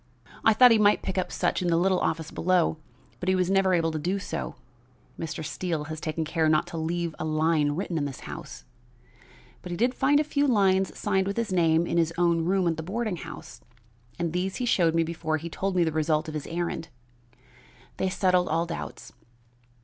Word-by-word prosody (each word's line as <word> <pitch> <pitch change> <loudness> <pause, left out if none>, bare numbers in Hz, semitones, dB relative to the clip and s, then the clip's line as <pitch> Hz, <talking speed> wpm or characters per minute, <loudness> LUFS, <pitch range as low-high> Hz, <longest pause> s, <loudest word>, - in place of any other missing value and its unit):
I 225 - +6
thought 245 +3 +7
he 225 - +5
might 205 0 +4
pick 190 0 -1
up 185 - -3
such - - 0
in 180 - -1
the 165 -1 +3
little 185 +1 +2
office 160 -1 -2
below, 175 -2 +1 0.4
but 185 - -2
he 190 - +3
was 185 0 +1
never 195 -1 +3
able 165 -1 +1
to 155 - -3
do 180 +6 -1
so 165 -4 -5 0.6
Mr. 160 -1 -4
Steele 160 +1 -3
has 155 - -7
taken 160 0 -2
care 160 0 +1
not 155 +2 +3
to - - -3
leave 170 +1 -2
a - - -2
line 155 -1 +1
written 170 0 -2
in 145 - -1
this 135 -2 -6
house - - -9 1.0
but 180 - -9
he 175 - -4
did 245 +5 +2
find 285 +2 +3
a - - +3
few 290 -1 0
lines 195 -5 +2
signed 190 -2 0
with 200 - -3
his 230 -5 -1
name 165 -2 +3
in 170 - 0
his 165 -1 +2
own 170 -2 +2
room 185 0 +2
at 165 -2 0
the - - -3
boarding 205 +3 -3
house, - - -10 0.6
and 170 -1 -2
these 185 +2 -1
he 250 - -2
showed 170 -8 +2
me 165 - +3
before 160 -1 -2
he 165 +2 -6
told 195 +2 -2
me 180 - +4
the 160 - 0
result 155 0 0
of 155 - -6
his 150 -2 -5
errand. 170 -1 -3 1.1
They 190 - 0
settled 185 -1 +2
all 165 +2 +1
doubts. 170 0 -7
170 Hz, 215 wpm, -26 LUFS, 160-190 Hz, 1.1 s, thought